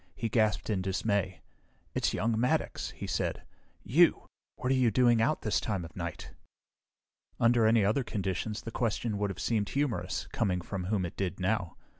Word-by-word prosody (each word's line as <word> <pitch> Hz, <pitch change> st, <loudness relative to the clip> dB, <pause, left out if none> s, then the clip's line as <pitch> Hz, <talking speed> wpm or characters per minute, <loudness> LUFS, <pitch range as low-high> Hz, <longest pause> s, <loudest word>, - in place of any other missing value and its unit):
He 115 Hz, +3 st, -2 dB
gasped 110 Hz, -1 st, +1 dB
in 95 Hz, -3 st, 0 dB
dismay. 95 Hz, 0 st, -1 dB, 0.5 s
"It's -, -, +1 dB
young 115 Hz, +2 st, 0 dB
Maddox," 125 Hz, +2 st, 0 dB
he -, -, -7 dB
said. -, -, -2 dB, 0.4 s
"You! 165 Hz, -, +4 dB, 0.3 s
What 125 Hz, -, -2 dB
are -, -, +4 dB
you 125 Hz, -2 st, +4 dB
doing 120 Hz, 0 st, +4 dB
out 140 Hz, +7 st, +1 dB
this 105 Hz, -, +1 dB
time 95 Hz, -6 st, -2 dB
of 80 Hz, -, -12 dB
night?" 85 Hz, -2 st, -5 dB, 1.1 s
Under 115 Hz, -1 st, +4 dB
any 110 Hz, -2 st, +4 dB
other 110 Hz, +7 st, +2 dB
conditions, 105 Hz, +1 st, -3 dB
the 115 Hz, -, -6 dB
question 115 Hz, -3 st, -1 dB
would 105 Hz, -1 st, 0 dB
have 95 Hz, -, -6 dB
seemed 105 Hz, -4 st, 0 dB
humorous, 135 Hz, -9 st, -1 dB
coming 90 Hz, -2 st, 0 dB
from 90 Hz, +1 st, -5 dB
whom 95 Hz, -1 st, 0 dB
it 85 Hz, -, -7 dB
did 95 Hz, -1 st, -2 dB
now. 95 Hz, -2 st, -1 dB
105 Hz, 175 wpm, -30 LUFS, 95-115 Hz, 1.1 s, You